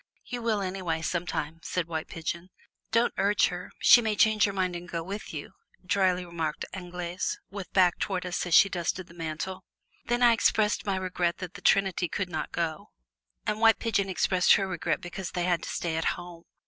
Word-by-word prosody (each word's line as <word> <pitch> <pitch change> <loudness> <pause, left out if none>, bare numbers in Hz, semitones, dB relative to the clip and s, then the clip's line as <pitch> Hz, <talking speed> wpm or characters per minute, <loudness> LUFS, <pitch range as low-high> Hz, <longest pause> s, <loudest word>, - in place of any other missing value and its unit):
"You 245 -1 -5
will 220 -3 0
anyway 185 -4 -2
sometime!" 165 -2 -2
said 180 0 -2
White 160 -2 -4
Pigeon. 170 +2 -5 0.4
"Don't 230 +1 +3
urge 205 +1 +3
her; 180 0 -7
she 240 - +7
may 220 -2 0
change 215 0 +4
her 200 - 0
mind 185 -2 -1
and 175 0 -7
go 165 -1 -3
with 200 +4 -6
you," 150 +2 -6 0.3
dryly 185 -1 +2
remarked 165 -3 -3
Anglaise 180 -1 -4
with 195 -3 -7
back 180 -2 +4
towards 185 -3 -2
us 180 0 -2
as 170 - +3
she - - +8
dusted 180 0 -2
the 170 - -16
mantel. 170 +3 -5 0.4
Then 240 +1 +1
I 240 -1 +7
expressed 215 -2 +2
my 195 - +1
regret 180 -2 -1
that 185 -1 -7
the - - -10
trinity 190 -3 +2
could 195 +2 -2
not 155 -3 -4
go, 165 -2 -3 0.6
and 210 0 -1
White 225 -1 +6
Pigeon 200 -4 0
expressed 185 0 +4
her 195 -2 +2
regret 175 -4 -1
because 175 +1 -6
they 175 - -2
had 175 -2 +1
to - - -6
stay 165 -2 -2
at 160 - -1
home. 175 -1 -10
180 Hz, 200 wpm, -28 LUFS, 170-200 Hz, 0.6 s, she